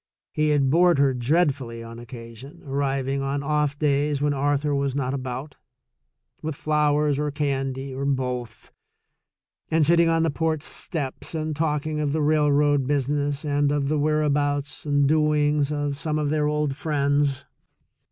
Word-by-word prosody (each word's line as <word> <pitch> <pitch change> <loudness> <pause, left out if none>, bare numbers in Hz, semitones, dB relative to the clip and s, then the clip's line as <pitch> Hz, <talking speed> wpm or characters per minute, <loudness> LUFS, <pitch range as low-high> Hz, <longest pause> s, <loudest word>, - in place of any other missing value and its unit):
He 155 0 +1
had 140 -3 +2
bored 175 0 +4
her 140 -1 +3
dreadfully 130 -3 0
on 115 0 -9
occasion, 120 +5 -11
arriving 135 -1 -1
on 140 +1 -2
off 150 -1 0
days 145 0 +1
when 145 0 +1
Arthur 145 +1 0
was 140 -1 -1
not 135 -2 -1
about, 130 +1 -5 0.8
with 155 -1 -4
flowers 150 -1 +1
or 150 0 0
candy, 135 -2 -2
or 135 +1 -4
both, 125 -4 -3 1.0
and 160 -1 +3
sitting 170 +1 +4
on 165 0 +2
the 165 - +1
porch 160 0 -1
steps 150 -1 -5
and 155 -1 -2
talking 150 0 -1
of 145 -2 -1
the 155 - 0
railroad 145 -2 +3
business 145 +1 -1
and 145 -1 +1
of 145 -1 0
the 155 0 +1
whereabouts 145 -1 0
and 145 -1 +3
doings 150 -1 +2
of 145 -1 -2
some 155 -1 -1
of 150 -1 -1
their 150 -1 +1
old 150 -2 0
friends. 145 -2 0
145 Hz, 150 wpm, -24 LUFS, 140-150 Hz, 1.0 s, bored